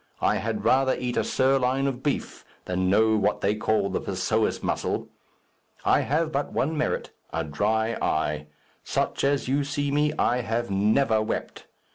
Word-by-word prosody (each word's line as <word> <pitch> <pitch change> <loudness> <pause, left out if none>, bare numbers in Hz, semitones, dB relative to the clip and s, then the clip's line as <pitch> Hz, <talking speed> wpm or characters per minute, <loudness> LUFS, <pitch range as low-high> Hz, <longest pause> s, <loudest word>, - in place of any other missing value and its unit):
I - - +2
had - - -3
rather 130 0 +4
eat 125 -1 -3
a - - +2
sirloin 130 0 +2
of 135 -2 -2
beef 145 - -3 0.2
than 90 0 0
know 110 +3 +4
what 105 - +1
they 100 - +2
call 105 -2 0
the - - -1
psoas 100 +4 -1
muscle. - - -2 0.8
I - - +4
have 155 +3 0
but 140 0 -2
one 155 +4 0
merit 155 - -1 0.2
a 80 0 -1
dry 110 +9 0
eye. 75 -1 -1 0.4
Such - - -1
as 140 -1 +1
you 140 +2 +1
see 145 0 -2
me, 150 +1 +2
I 125 - +2
have 115 -1 -2
never 110 +3 +3
wept. 110 - -4
120 Hz, 165 wpm, -26 LUFS, 105-140 Hz, 0.8 s, rather